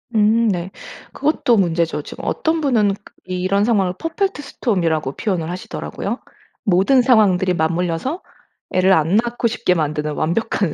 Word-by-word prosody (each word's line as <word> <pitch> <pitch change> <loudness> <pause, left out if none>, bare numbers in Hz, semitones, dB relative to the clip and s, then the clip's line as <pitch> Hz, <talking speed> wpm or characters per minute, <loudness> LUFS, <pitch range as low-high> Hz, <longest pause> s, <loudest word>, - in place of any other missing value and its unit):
음 220 +2 +4
네. 185 -1 -2 0.4
그것도 280 -5 +1
문제죠. 170 -4 +1
지금 - - -10
어떤 320 0 0
분은 225 -8 +2 0.4
이 185 -1 -3
이런 200 +2 +2
상황을 195 -6 +2
퍼펙트 330 +1 -2
스톰이라고 170 - -1
표현을 175 -6 -2
하시더라고요. 180 +1 -5 0.4
"모든 200 +8 +4
상황들이 200 -7 +3
맞물려서 170 - -1 0.5
애를 185 +1 +4
안 165 +4 +3
낳고 240 +1 0
싶게 200 -5 0
만드는 150 -2 -1
완벽한 175 +2 -1
190 Hz, 335 characters per minute, -19 LUFS, 170-235 Hz, 0.5 s, 음